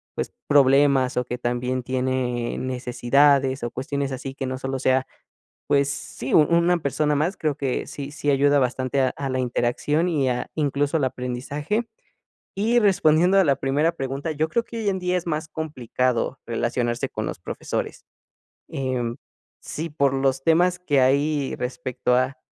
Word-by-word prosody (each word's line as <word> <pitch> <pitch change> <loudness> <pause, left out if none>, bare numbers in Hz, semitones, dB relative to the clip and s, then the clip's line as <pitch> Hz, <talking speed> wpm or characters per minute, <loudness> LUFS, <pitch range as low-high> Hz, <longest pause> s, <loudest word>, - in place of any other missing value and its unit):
pues, - - -4
problemas 135 -2 +4
o 125 - +2
que 125 +1 -4
también 125 +1 -2
tiene 125 -1 -1
necesidades, 130 +2 +2
o 120 - -2
cuestiones 140 +2 -3
así, 135 +1 -6
que 135 - -4
no 130 0 -3
solo 135 0 -3
sea, 130 0 +2 0.6
pues, 140 -1 +3
sí, 130 -2 -6
u - - +8
una 170 +3 +3
persona 150 0 0
más, 165 +7 0
creo 150 -3 -1
que 135 -3 -2
sí 140 -1 -7
sí 145 -1 -1
ayuda 145 +1 +4
bastante 130 +1 0
a 130 - +3
a 140 - -3
la 130 0 0
interacción 130 +7 0
y 140 -6 +1
a 125 0 -3
incluso, 145 0 0
al 145 - +1
aprendizaje. 140 - -3 0.7
Y 220 +5 +2
respondiendo 185 -2 +4
a - - +6
la 140 -2 +3
primera 145 +5 +1
pregunta, 135 +3 -4
yo 155 +1 0
creo 235 +7 +1
que 230 - -8
hoy 215 -2 0
en 190 -1 -1
día 180 0 0
es 175 - -4
más 155 -1 -2
complicado 130 -5 -2
relacionarse 120 0 -1
con - - -4
los - - -5
profesores. - - -4 0.7
Em, 125 -3 -2 0.4
sí, 165 +2 -5
por 140 -3 +1
los 135 0 0
temas 175 +3 +3
que 145 -7 +2
hay 140 +2 +1
respecto 125 -1 -2
a, 130 +2 0
135 Hz, 170 wpm, -23 LUFS, 130-155 Hz, 0.7 s, u